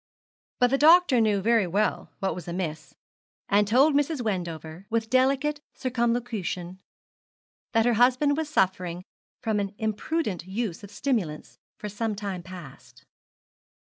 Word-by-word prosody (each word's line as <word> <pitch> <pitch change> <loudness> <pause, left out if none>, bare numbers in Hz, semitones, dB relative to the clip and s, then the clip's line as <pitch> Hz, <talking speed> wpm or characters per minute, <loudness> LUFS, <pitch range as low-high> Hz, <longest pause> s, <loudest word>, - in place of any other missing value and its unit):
But 245 0 +3
the 275 - +2
doctor 320 -5 +6
knew 210 -3 +2
very 225 -2 +3
well 205 +5 -1
what 190 -2 -1
was 180 +1 -8
amiss, 170 -3 -5 0.5
and 205 0 +3
told 270 +8 +4
Mrs. 290 +1 +1
Wendover, 175 -5 -4
with 225 -1 -1
delicate 275 +3 +2
circumlocution, 235 -8 -2 0.9
that 225 0 +3
her 245 - +3
husband 255 +5 +3
was 315 0 -3
suffering 185 - 0 0.4
from 220 -2 0
an 200 0 -3
imprudent 215 - -2
use 200 -1 -3
of 205 - -9
stimulants 205 - -3 0.2
for 210 - -6
some 210 +1 -3
time 195 -3 -4
past. 135 -10 -12
215 Hz, 135 wpm, -26 LUFS, 185-250 Hz, 0.9 s, doctor